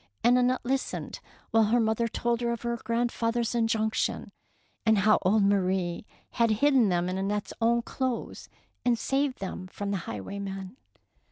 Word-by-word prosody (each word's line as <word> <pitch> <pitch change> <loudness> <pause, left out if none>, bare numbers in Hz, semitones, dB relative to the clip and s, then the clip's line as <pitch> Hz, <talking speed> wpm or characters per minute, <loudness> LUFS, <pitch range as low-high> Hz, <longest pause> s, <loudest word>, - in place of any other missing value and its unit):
and 245 +1 +5
Annette 250 0 +2
listened 265 +1 -2 0.3
while 225 -1 +5
her 235 +3 +3
mother 225 +1 +1
told 235 +1 -1
her 235 0 0
of 235 -1 -4
her 235 0 -1
grandfather's 235 0 -1
injunc 225 -2 +1
tion, - - -2 0.5
and 220 -1 +4
how 215 +2 +4
old 200 +3 +3
Marie 190 -2 0 0.2
had 230 -1 +2
hidden 250 0 +4
them 175 -1 +1
in 185 +1 -2
Annette's 205 +1 -2
own 235 +1 +3
clothes 255 -1 -4 0.3
and 240 -1 +2
saved 270 +2 0
them 185 -1 -6
from 200 +2 -5
the 200 - 0
highwaymen. 195 - -6
225 Hz, 160 wpm, -28 LUFS, 200-240 Hz, 0.5 s, and